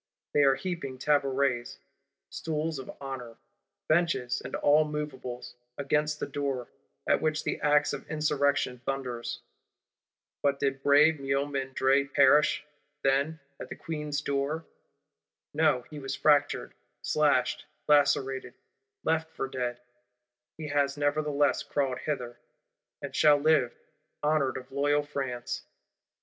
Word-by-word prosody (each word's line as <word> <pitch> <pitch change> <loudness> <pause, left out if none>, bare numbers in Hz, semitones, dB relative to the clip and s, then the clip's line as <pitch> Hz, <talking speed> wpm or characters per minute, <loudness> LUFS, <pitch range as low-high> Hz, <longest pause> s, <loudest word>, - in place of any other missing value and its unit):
They 145 - +4
are 135 -1 +5
heaping 135 -3 -4
tabourets 135 - +1 0.5
(stools 155 -1 -3
of 130 - -8
honour), 130 -4 -7 0.5
benches 155 -6 +1
and - - -5
all 150 +2 +4
moveables, 130 -5 -5 0.2
against 150 +2 0
the - - -1
door; 140 -3 -3 0.4
at - - +3
which 155 0 0
the - - -2
axe 145 0 +3
of - - -7
Insurrection 145 -4 +1
thunders.—But 135 +2 -5
did 135 -1 -1
brave 145 +2 +5
Miomandre 135 0 0
perish, 145 +3 +5 0.4
then, 140 +4 +1 0.2
at - - -7
the - - -6
Queen's 150 -2 -4
door? 140 +3 -2 0.9
No, 145 -5 +2
he 150 - -7
was 135 -1 -4
fractured, 145 -1 +2 0.3
slashed, 145 -4 +1 0.2
lacerated, 135 -3 +2 0.5
left 160 0 0
for 135 - -4
dead; 125 -2 -3 0.8
he 155 -1 -6
has 140 -1 +1
nevertheless 145 -1 +1
crawled 135 -3 -1
hither; 125 -5 -4 0.6
and - - -6
shall 150 -1 +6
live, 145 -4 +3 0.5
honoured 150 -3 +2
of 130 0 -10
loyal 145 +2 +2
France. 135 -4 -4
140 Hz, 115 wpm, -29 LUFS, 135-150 Hz, 0.9 s, shall